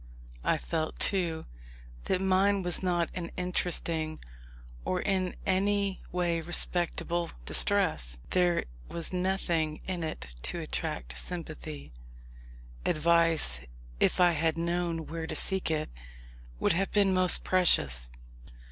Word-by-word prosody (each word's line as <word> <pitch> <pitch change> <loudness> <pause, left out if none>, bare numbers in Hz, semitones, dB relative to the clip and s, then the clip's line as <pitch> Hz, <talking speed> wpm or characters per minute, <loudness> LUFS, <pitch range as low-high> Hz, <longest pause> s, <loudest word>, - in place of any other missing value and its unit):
I - - +2
felt, 155 - -3
too, 170 -5 +1 0.6
that 185 - 0
mine 190 +1 +2
was 175 -1 -1
not 175 -3 0
an 170 -2 -5
interesting, 170 -3 -2 0.7
or 185 - -1
in 185 -2 -1
any 200 +1 0
way 175 -2 0
respectable 175 0 +1 0.2
distress. - - +2
There 175 -2 +2 0.3
was 170 +1 -4
nothing 175 -4 -1
in 180 -3 -3
it 65 - -6
to - - -2
attract 60 0 -4
sympathy. 155 - -6 0.9
Advice, 165 - +3 0.4
if - - +2
I 175 -1 +6
had 160 0 0
known 170 -1 -2
where 165 0 -5
to - - -4
seek 190 -3 +2
it, 155 -1 -2 0.7
would - - +2
have 190 +3 0
been 200 -2 +3
most 185 -1 +4
precious. 65 - +5
170 Hz, 120 wpm, -29 LUFS, 160-185 Hz, 0.9 s, I